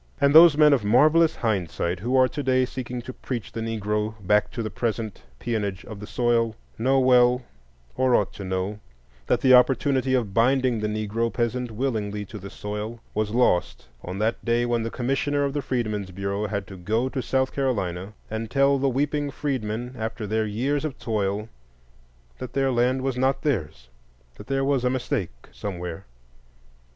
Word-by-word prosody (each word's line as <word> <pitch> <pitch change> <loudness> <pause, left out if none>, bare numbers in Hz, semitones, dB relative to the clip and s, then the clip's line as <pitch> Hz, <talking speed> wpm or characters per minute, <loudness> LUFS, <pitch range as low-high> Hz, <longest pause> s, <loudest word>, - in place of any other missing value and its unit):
And 140 0 +4
those 160 -1 +9
men 150 -1 +6
of 130 -6 +2
marvellous 155 +9 +4
hindsight 90 -5 -1
who 120 +7 -1
are 130 -1 +6
today 130 -2 +1
seeking 125 -1 -6
to 130 - -7
preach 120 -6 -5
the 115 +1 -5
Negro 105 -1 -2
back 105 +2 +3
to 115 0 -4
the 110 - -4
present 110 -3 -3 0.2
peonage 105 -5 -3
of 110 -4 -9
the 105 - -8
soil 115 -2 +1 0.2
know 135 +3 +3
well, 125 -1 +4 0.5
or 130 -1 +3
ought 105 - +1
to 100 - -8
know, 95 +2 -3 0.5
that - - +2
the 130 -1 +5
opportunity 130 +1 +4
of 110 -6 -1
binding 125 +1 +2
the 105 - -1
Negro 110 +2 -1
peasant 120 +1 -1
willingly 105 -4 -2
to 105 +2 -9
the 100 +1 -8
soil 105 +3 -5
was 105 0 -1
lost 110 -6 +1 0.2
on 90 +2 -6
that 110 +3 -1
day 120 0 +1
when 120 -1 0
the 115 - -2
Commissioner 135 +4 0
of 140 -1 -1
the 145 - -1
Freedmen's 110 -7 -2
Bureau 100 +3 -3
had 100 -2 -3
to 95 +1 -10
go 110 +8 0
to 130 0 -3
South 130 +1 0
Carolina 100 -8 -2
and 110 0 -4
tell 140 +1 +3
the 135 0 +2
weeping 145 +2 0
freedmen, 125 -4 -3
after 110 -1 -4
their 110 +1 0
years 135 +8 -1
of 155 -4 -4
toil, 105 -1 -2 0.9
that 130 -1 -7
their 135 -1 +1
land 125 +2 +1
was 130 -2 -1
not 130 +1 +1
theirs, 80 - -2 0.5
that - - -11
there 135 0 0
was 135 -3 +1
a 125 - +2
mistake—somewhere. 90 - -4
120 Hz, 175 wpm, -25 LUFS, 105-130 Hz, 0.9 s, those